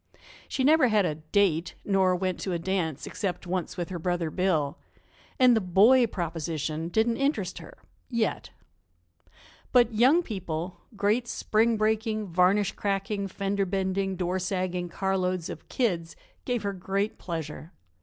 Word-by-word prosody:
She 265 - -1
never 300 -1 +5
had 215 -4 +3
a 155 - 0
"date," 165 +1 0
nor 190 -2 +3
went 185 0 -2
to 190 - -3
a - - 0
dance, 165 -4 -2
except 190 -3 -4
once 180 0 -3
with 175 -2 -3
her 180 -2 -4
brother, 175 -1 -1
Bill, 160 -7 0 0.6
and 250 -2 +6
the 220 - +2
"boy 215 +8 +5
proposition" 165 -3 -3
didn't 225 +6 +1
interest 275 +2 -1
her - - -12 0.3
yet. 235 -3 -1 1.2
But 240 -2 +4
young 260 +11 +5
people 175 - -5
great 210 +4 +1
spring 225 0 +1
breaking, 215 0 0
varnish 185 +2 +3
cracking, 200 0 -2
fender 195 +1 -1
bending, 190 0 -1
door 180 +1 -1
sagging 180 -1 -2
carloads 185 -2 -1
of - - -10
"kids" 175 -10 -1 0.3
gave 245 -4 -1
her 200 0 -1
great 195 +3 -2
pleasure. 160 -1 -6
190 Hz, 145 wpm, -27 LUFS, 175-215 Hz, 1.2 s, and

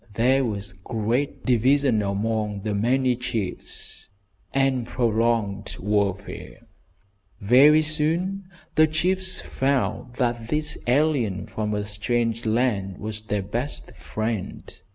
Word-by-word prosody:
There 130 +4 +3
was 100 -5 -3
great 115 +8 -2
division 130 -1 +3
among 105 0 -1
the 105 +1 -2
many 125 +4 +2
chiefs, 115 -6 -4 0.4
and 135 -3 +1
prolonged 115 -4 0
warfare. 100 -1 -2 0.7
Very 140 +9 +6
soon 165 +6 -1 0.3
the 155 0 +5
chiefs 185 +4 0
found 130 -2 -1
that 120 -3 -1
this 150 +2 0
alien 125 -7 +1
from 105 -1 -3
a 105 - -1
strange 115 +2 -1
land 110 -5 0
was 110 0 -6
their 105 -2 -2
best 120 +9 -5
friend. 110 -3 -4
115 Hz, 110 wpm, -24 LUFS, 105-135 Hz, 0.7 s, Very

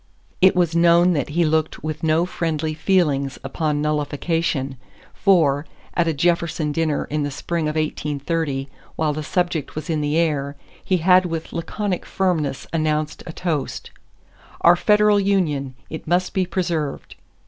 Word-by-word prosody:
It 190 0 +6
was 175 -2 +1
known 170 +1 +5
that 145 -4 -1
he 170 +3 +1
looked 155 0 0
with 155 -1 -4
no 160 +1 +2
friendly 160 -3 -2
feelings 150 -6 +1
upon 150 +2 -1
nullification, 150 -2 -1 0.4
for, 160 -7 +3 0.3
at 170 -1 +1
a - - +3
Jefferson 170 -1 +1
dinner 155 -1 0
in 150 0 0
the 145 - -1
spring 160 +4 -3
of 150 - -2
1830 150 -2 -2 0.3
while 155 -2 0
the 155 - -4
subject 175 -1 -1
was 155 +3 -4
in 155 -1 0
the 150 +1 0
air, 145 -4 0 0.3
he 185 -1 +1
had 180 +2 +4
with 165 -1 -5
laconic 185 +3 -3
firmness 165 -8 -1
announced 155 -1 -1
a - - -4
toast: 160 -4 -3 0.7
"Our 170 +1 +7
federal 210 +2 +4
union; 155 -10 0
it 160 - -8
must 180 +2 +1
be 185 -2 0
preserved." 170 -6 -2
160 Hz, 150 wpm, -22 LUFS, 150-175 Hz, 0.7 s, Our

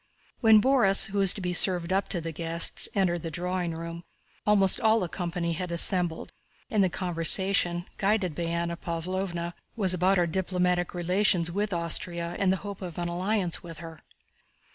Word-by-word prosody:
When 220 -2 +6
Borís, 230 -6 +3
who 200 - -2
was 195 -2 +6
to 200 - -8
be 180 -1 -2
served 180 -1 +2
up 195 +1 -1
to 175 - 0
the 165 0 -5
guests, 165 +1 0
entered 175 -4 0
the 165 - -5
drawing 175 +1 -3
room, 170 +1 -7 0.4
almost 200 -1 +4
all 220 0 +3
the 180 - -2
company 170 -1 -4
had 180 +1 -5
assembled, 170 -1 +2 0.4
and 210 -3 +2
the 185 - +1
conversation, 175 0 +2
guided 195 -4 0
by 170 +3 -4
Anna 170 0 -2
Pávlovna, 175 +1 -4 0.2
was 195 -5 +4
about 185 +2 +2
our 175 - +2
diplomatic 180 0 -1
relations 180 0 +1
with 205 +3 -2
Austria 170 0 -2
and 195 -2 +2
the 190 - 0
hope 200 -1 -7
of 175 -3 -8
an 175 0 -3
alliance 180 0 -2
with 165 -2 -10
her. 165 -1 -11
180 Hz, 175 wpm, -26 LUFS, 170-195 Hz, 0.4 s, When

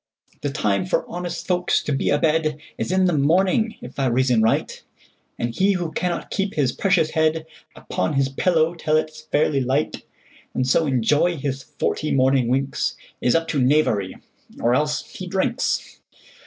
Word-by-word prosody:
The - - -1
time - - 0
for - - 0
honest 175 -1 -5
folks 180 -1 +1
to - - -3
be 135 - 0
a 145 - +3
bedIs 155 +1 -1
in 185 0 +3
the 180 - +2
morning, 185 +9 +2
if 125 +3 -9
I 135 - +2
reason 125 -1 +2
right; 110 - 0 0.6
And 120 0 -2
he 195 +7 +2
who 175 -3 -2
cannot 180 +1 -3
keep 195 0 -2
his 135 -5 +2
precious 170 -1 +1
headUpon 160 - -2
his 135 -1 +2
pillow 160 +3 +1
till 155 -2 +1
it 155 0 -1
's - - -11
fairly 145 -2 +2
light, 135 +4 -1 0.5
And 130 - 0
so 155 +4 +3
enjoy 145 +7 +2
his 135 -1 -3
forty 150 +2 -3
morning 130 -2 +3
winks, 135 +2 0 0.3
Is 125 - +2
up 165 0 +1
to 140 - 0
knavery; 125 -8 +2 0.4
or 120 - +2
else—he 150 +6 -2
drinks! 190 +1 -1
150 Hz, 165 wpm, -22 LUFS, 135-175 Hz, 0.6 s, a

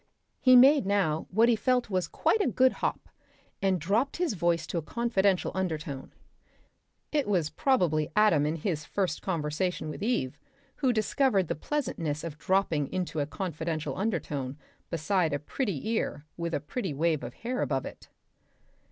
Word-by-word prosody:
He 255 -1 +6
made 270 -2 +7
now 190 -6 +1
what 225 +5 +4
he 240 - +4
felt 250 0 +1
was 185 -1 0
quite 440 - +1
a - - +2
good 260 +1 +4
hop, - - -2 0.5
and 195 -1 +3
he - - 0
dropped 210 - 0
his 345 -7 0
voice 170 -3 +1
to 170 - -2
a - - -4
confidential 200 0 +1
undertone. 155 -7 -3 1.0
(It 295 -5 +1
was 175 -7 +1
probably 170 - +1
Adam 210 -9 +4
in 155 - -1
his 160 -2 -2
first 185 -4 -2
conversation 165 -1 -2
with 155 - -8
Eve, 215 - -1 0.4
who 265 -3 +2
discovered 215 - +1
the - - +1
pleasantness 165 - -2
of 155 -3 -6
dropping 170 -7 +1
into 180 -4 -2
a 145 - 0
confidential 160 -3 -3
undertone 150 -9 -2 0.3
beside 165 0 0
a - - +1
pretty 180 - -3
ear 155 -9 -2
with 170 -1 -2
a - - 0
pretty 160 - -4
wave 160 0 +1
of 120 0 -7
hair 250 +2 -3
above 135 -2 -1
it.) - - -10
180 Hz, 165 wpm, -29 LUFS, 155-220 Hz, 1.0 s, made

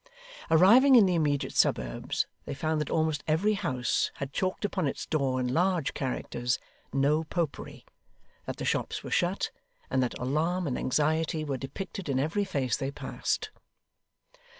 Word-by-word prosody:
Arriving 230 - +7
in 225 -5 +8
the 185 - +2
immediate 150 -4 0
suburbs, - - +1 0.2
they - - -4
found 155 0 0
that 150 - -3
almost 155 -2 0
every 175 +8 +2
house 130 -11 0
had 140 -1 -6
chalked 185 +2 -1
upon 185 -6 -1
its 135 - -3
door 135 -4 0
in 125 0 -1
large 175 -3 +1
characters 125 -2 -2 0.3
'No 145 +3 +2
Popery,' 165 -2 -4 0.6
that - - -4
the - - -4
shops - - -1
were - - -7
shut, - - +1 0.4
and 130 - +2
that 125 - -1
alarm 160 +8 0
and 130 -5 -1
anxiety 155 +3 0
were 140 -2 -2
depicted 170 +6 -6
in 130 -1 +1
every 165 +9 0
face 140 -10 0
they 135 -1 -3
passed. 140 - -3
155 Hz, 155 wpm, -29 LUFS, 135-175 Hz, 0.6 s, in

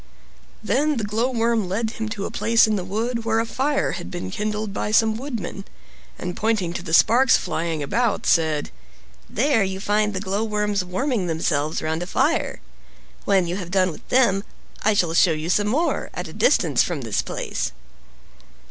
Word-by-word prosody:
Then 290 +4 +1
the 225 - -2
Glowworm 230 -1 0
led 220 +4 -1
him 220 -1 -4
to 205 -2 -4
a - - -5
place 230 0 +4
in 215 -1 0
the 190 - -2
wood 230 +5 -2
where 225 0 +1
a 230 - 0
fire 275 +5 0
had 85 - -6
been 95 +1 -5
kindled 210 - -3
by 205 - -2
some 220 0 +3
woodmen, 225 -7 -5 0.5
and 180 -1 -5
pointing 210 -6 0
to - - -4
the 170 -2 -7
sparks 245 +10 +5
flying 165 -2 -2
about, 225 - 0
said, 155 -3 +2 0.6
"There 240 -1 +2
you 190 0 -3
find 210 +1 +1
the - - -1
glowworms 210 0 -1
warming 195 +2 -1
themselves 155 -2 -1
round 160 +1 -1
a 175 - -4
fire. - - 0 0.6
When 195 -3 +3
you 175 +2 -3
have 180 -4 -6
done 185 -1 +2
with 155 - -13
them 235 -7 +3 0.4
I 215 0 +2
shall 170 -4 +1
show 165 0 +4
you 155 +3 -2
some 205 +2 +2
more, 295 +11 0
at - - -4
a - - -10
distance - - +3
from 170 -5 -1
this 115 -4 -1
place." - - -3
205 Hz, 180 wpm, -23 LUFS, 175-225 Hz, 0.6 s, sparks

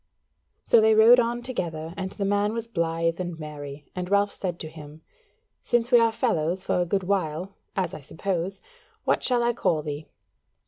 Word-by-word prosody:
So 230 - +6
they 220 0 +5
rode 230 +3 +8
on 240 0 0
together 165 -10 -3
and 190 -1 -3
the 200 - -4
man 205 +1 +1
was 230 0 -2
blithe 165 -5 -1
and 175 -2 -4
merry: 145 -2 -8
and 180 0 -4
Ralph 200 0 +3
said 175 -3 -4
to 155 - -5
him: 155 0 -12 0.6
"Since 240 +1 +1
we 240 - +8
are 230 -1 +4
fellows 185 - 0
for 180 - +1
a 175 - -1
good 195 +2 0
while, 185 -1 -1 0.2
as 185 -3 -1
I - - -7
suppose, 180 +5 -3 0.4
what - - +2
shall 245 -2 +2
I 240 0 +2
call 160 -9 0
thee?" 150 0 -5
185 Hz, 185 wpm, -26 LUFS, 160-220 Hz, 0.6 s, rode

